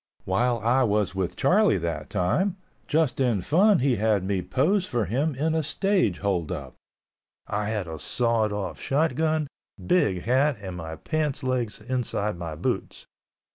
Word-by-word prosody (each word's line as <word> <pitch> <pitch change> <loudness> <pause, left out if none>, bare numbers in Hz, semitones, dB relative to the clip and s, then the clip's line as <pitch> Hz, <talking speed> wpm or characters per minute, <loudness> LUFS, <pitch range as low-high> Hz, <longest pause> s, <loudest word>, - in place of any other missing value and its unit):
While 120 +6 +1
I 120 +4 +3
was 105 -5 +1
with 95 -2 -2
Charlie 200 - +3
that 85 -2 -4
time, 170 - 0 0.3
just 155 -5 +1
in 120 -7 +2
fun 195 - +4
he 130 -2 +2
had 105 -2 +2
me 95 -1 -1
pose 160 - +1
for 120 - 0
him 135 - 0
in 155 +4 0
a 160 - +1
stage 180 - +1
hold 95 -5 -1
up. 70 -7 -5 0.7
I 105 0 -2
had 105 -5 -2
a 80 -1 -6
sawed 115 - +1
off 105 -2 -4
shot 150 +2 +1
gun, 155 +2 +1 0.3
big 105 - +1
hat 130 +3 +2
and 95 -3 -6
my 80 -2 -6
pants 150 - -2
legs 125 -4 -1
inside 110 -4 -2
my 85 -3 -6
boots. - - -3
115 Hz, 165 wpm, -26 LUFS, 95-150 Hz, 0.7 s, fun